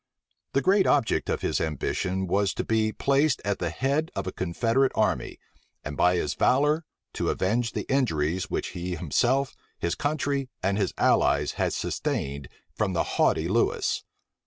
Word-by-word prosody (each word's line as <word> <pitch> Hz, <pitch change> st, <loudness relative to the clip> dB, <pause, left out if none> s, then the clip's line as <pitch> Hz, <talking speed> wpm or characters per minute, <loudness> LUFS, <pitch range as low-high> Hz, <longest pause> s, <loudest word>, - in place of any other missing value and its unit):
The 135 Hz, -, +2 dB
great 195 Hz, +4 st, +4 dB
object 140 Hz, -6 st, +2 dB
of -, -, -1 dB
his -, -, 0 dB
ambition 90 Hz, +5 st, -1 dB
was 100 Hz, +2 st, +1 dB
to -, -, -2 dB
be 110 Hz, -1 st, +1 dB
placed 140 Hz, +4 st, +2 dB
at 100 Hz, -1 st, -1 dB
the 85 Hz, -, -1 dB
head 140 Hz, -, 0 dB
of -, -, -2 dB
a 95 Hz, -, -3 dB
confederate 115 Hz, +10 st, +1 dB
army, -, -, 0 dB, 0.5 s
and 75 Hz, -, -5 dB
by 90 Hz, +4 st, +3 dB
his 75 Hz, -5 st, -1 dB
valor 150 Hz, +5 st, +2 dB, 0.3 s
to -, -, -1 dB
avenge 115 Hz, +5 st, 0 dB
the -, -, -3 dB
injuries 90 Hz, -, 0 dB
which -, -, -2 dB
he 90 Hz, 0 st, -4 dB
himself, 125 Hz, -, +1 dB, 0.2 s
his 85 Hz, -, -1 dB
country, 140 Hz, -2 st, -1 dB
and 100 Hz, +2 st, +1 dB
his 95 Hz, -, -1 dB
allies, 70 Hz, +1 st, +3 dB
had -, -, -1 dB
sustained 70 Hz, +1 st, -3 dB, 0.3 s
from 100 Hz, -3 st, -1 dB
the 85 Hz, -, +1 dB
haughty 80 Hz, -, +1 dB
Lewis. 115 Hz, +6 st, +1 dB
100 Hz, 160 wpm, -26 LUFS, 90-135 Hz, 0.5 s, great